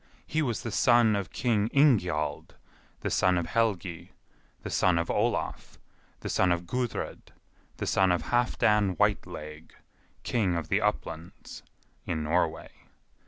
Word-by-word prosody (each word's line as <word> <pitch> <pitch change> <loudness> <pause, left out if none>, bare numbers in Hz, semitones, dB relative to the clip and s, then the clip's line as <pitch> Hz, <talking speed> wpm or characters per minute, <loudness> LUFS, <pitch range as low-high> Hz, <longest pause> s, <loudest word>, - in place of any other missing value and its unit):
He 155 - -1
was 120 -7 -2
the 115 - -4
son 120 -3 +4
of 100 -4 -3
King 110 -4 +1
Ingjald, 90 - +1 0.5
the - - -2
son 90 -1 +3
of 85 - -1
Helgi, 90 -4 -2 0.5
the - - -5
son 90 -2 +3
of 85 0 -1
Olaf, - - -2 0.4
the - - -5
son 95 -1 +2
of 85 0 -1
Gudred, 125 +4 -4 0.5
the - - -3
son 95 -1 +3
of 85 -2 0
Halfdan 105 -4 +2
Whiteleg, 75 +1 -2 0.5
king 100 -7 0
of 80 -2 -4
the 100 +2 +2
Uplands 85 -5 -4 0.5
(in 80 -4 -2
Norway). 80 +1 -1
95 Hz, 135 wpm, -28 LUFS, 85-115 Hz, 0.5 s, son